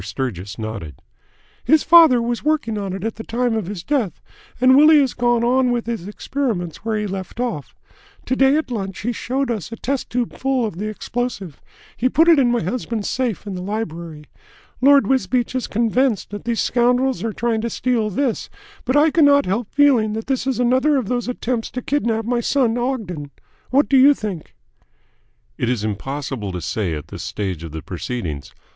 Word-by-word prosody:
Sturgis 100 -2 -5
nodded. 110 - -6 0.7
"His 315 -1 +4
father 315 -8 +7
was 240 0 -2
working 300 -7 0
on 200 -2 -3
it 190 0 -5
at 225 0 -3
the 225 - -6
time 240 +1 -1
of 215 -5 -2
his 190 -4 -6
death, 255 - -1 0.4
and 255 +1 +6
Willie 305 +2 +7
has 270 -3 +1
gone 240 -1 +1
on 250 +1 +3
with 240 -1 -1
his 225 -6 -4
experiments 210 - -3
where 220 0 -2
he 210 - -2
left 190 +2 -6
off. 235 - -3 0.5
To 260 - 0
day 270 +2 +4
at 310 -5 -3
lunch 195 -5 -4
he 240 - -1
showed 255 +2 -2
us 215 -4 -4
a - - -4
test 270 +3 -3
tube 245 -1 -2
full 265 -2 0
of 210 -6 -5
the 210 - -2
explosive. 215 - -4 0.3
He 255 - +1
put 325 +5 +3
it 330 -4 +6
in 250 -3 +3
my 240 - +1
husband's 225 +2 -3
safe 240 -6 -2
in 200 - -5
the 180 - -5
library. 170 -6 -5 0.6
Lord 280 +1 +6
Wisbeach 255 -2 0
is 255 -1 -2
convinced 230 0 0
that 205 - -7
these 235 -1 0
scoundrels 250 +1 +1
are 225 - -1
trying 225 +1 -1
to 235 - -2
steal 230 -3 0
this, 245 +3 -1 0.4
but 255 +4 +2
I 305 +2 +5
cannot 285 -3 +5
help 210 +4 -2
feeling 260 -7 +3
that 225 +1 -4
this 265 -1 -1
is 260 -3 -1
another 260 +4 +3
of 245 -7 -2
those 245 -1 -1
attempts 245 -2 -2
to 250 - -5
kidnap 230 -6 0
my 240 +1 0
son 240 -1 +1
Ogden. 220 - -3 0.4
What 280 +3 +3
do 275 - +4
you 280 +2 +7
think?" 200 - -6 1.0
"It 120 - 0
is 120 -4 -1
impossible 120 0 -4
to 90 - -3
say 95 -5 -2
at 75 - -8
this - - -7
stage 95 -6 -4
of 80 - -7
the 80 0 -7
proceedings. 85 - -5
235 Hz, 195 wpm, -20 LUFS, 190-260 Hz, 1.0 s, father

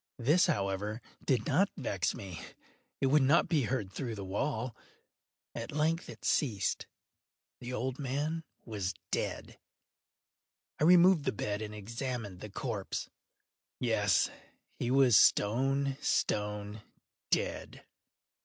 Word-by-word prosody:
This, 150 +9 +4
however, 100 +2 -1 0.2
did 125 -5 +1
not 180 +7 +3
vex 100 - -1
me; 95 -4 -7 0.6
it - - +3
would 145 +3 +5
not 145 +6 +4
be 150 -7 +2
heard 110 -6 -2
through 120 -2 -4
the 100 -2 -6
wall. 115 +4 -2 0.8
At - - -5
length 160 +3 0
it - - -10
ceased. 105 -10 0 0.7
The 125 0 -6
old 125 +2 -3
man 145 +4 -2 0.2
was 100 -5 -3 0.2
dead. - - -3 1.2
I 150 - +3
removed 180 -2 +6
the - - +2
bed 105 0 -3
and 105 -1 -5
examined 115 -2 -5
the 105 - -8
corpse. 100 -1 -4 0.7
Yes, 105 -6 +2 0.5
he 120 - -1
was 130 -3 +6
stone, 135 +5 +3
stone 105 0 -1 0.5
dead. - - -2
120 Hz, 120 wpm, -32 LUFS, 105-140 Hz, 1.2 s, removed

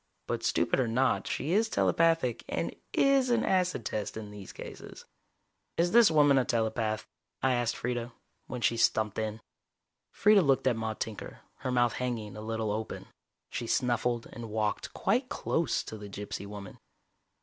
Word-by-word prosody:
But - - -2
stupid 85 - +2
or 130 - +2
not, 130 +4 +1
she 155 +5 -1
is 220 +2 +3
telepathic, 165 - +2
and - - -2 0.2
is 275 -2 +3
an 235 -1 +2
acid 180 - +1
test 105 0 -3
in 105 -2 -7
these 100 -2 -9
cases. - - -10 0.7
"Is 175 +1 +2
this 235 -1 +7
woman 145 -3 +5
a - - +2
telepath?" 110 -2 -1 0.4
I 130 -1 +4
asked 120 -2 0
Freeda, 120 0 -3 0.4
when 125 - -5
she 115 - +2
stumped 110 -2 +2
in. 110 0 -3 0.7
Freeda 210 -1 +5
looked 135 -3 +2
at 130 -3 +3
Maude 110 -1 -3
Tinker, 110 -1 -5 0.2
her 130 - -4
mouth 120 -1 +3
hanging 115 -5 -3
a 105 - -7
little 110 -1 -2
open. 110 +1 -4 0.4
She 120 - -3
snuffled 120 -1 +1
and 115 -1 -7
walked 105 0 -1
quite 250 +3 +1
close 165 0 0
to 110 - -8
the 105 -1 -8
gypsy 100 0 -6
woman. 100 -2 -9
120 Hz, 165 wpm, -30 LUFS, 110-145 Hz, 0.7 s, this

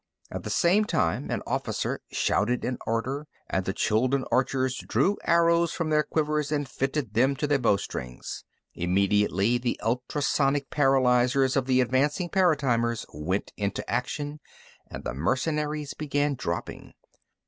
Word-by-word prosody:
At - - -4
the - - -5
same 190 +5 +3
time, 85 - 0
an - - -2
officer - - -2
shouted 120 +4 +1
an 125 -1 -2
order, 130 +6 -2 0.2
and 95 -1 -1
the 95 - 0
Chuldun 125 +7 +1
archers 130 0 +1
drew 165 - +1
arrows 170 0 +3
from 165 -3 -2
their 150 0 +4
quivers 150 -1 -1
and 145 -2 0
fitted 135 -3 -2
them 130 +5 +3
to 150 - -2
their 145 -1 +2
bowstrings. 65 - -2 0.3
Immediately, 100 +4 +2
the 120 0 -2
ultrasonic 135 +3 0
paralyzers 130 -1 +3
of 135 -2 +1
the 130 -1 +4
advancing 145 +8 +1
paratimers 135 - +1
went 85 +7 -3
into 100 -1 -3
action, 145 +3 -3 0.5
and - - -7
the - - -3
mercenaries 150 - -1
began 145 -1 0
dropping. 85 -10 -5
130 Hz, 135 wpm, -27 LUFS, 115-150 Hz, 0.5 s, their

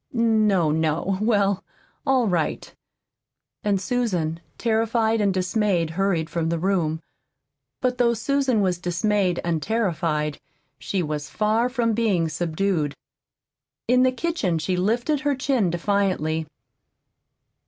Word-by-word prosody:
"No, 215 -8 +3
no; 160 +5 0
well, 200 -3 +2 0.4
all 260 -4 +3
right!" 170 -5 -1 0.9
And 200 -2 +1
Susan, 185 -8 -1 0.2
terrified 225 -1 +1
and 200 -1 +3
dismayed, 185 -3 0
hurried 175 -2 0
from 165 -1 -2
the 170 - 0
room. 165 -3 0 0.8
But 250 -1 0
though 235 -1 +3
Susan 265 -1 +1
was 180 -3 0
dismayed 180 +1 0
and 165 -2 -1
terrified, 165 -9 -1 0.4
she 190 -3 -2
was 150 -1 -4
far 220 +3 +1
from 240 -3 0
being 200 -8 +1
subdued. 165 -2 -1 0.9
In 250 +1 +4
the 255 0 +4
kitchen 255 - -1
she 180 +3 -1
lifted 235 +11 +1
her 290 0 0
chin 260 -7 +1
defiantly. 170 -3 0
195 Hz, 120 wpm, -24 LUFS, 170-230 Hz, 0.9 s, In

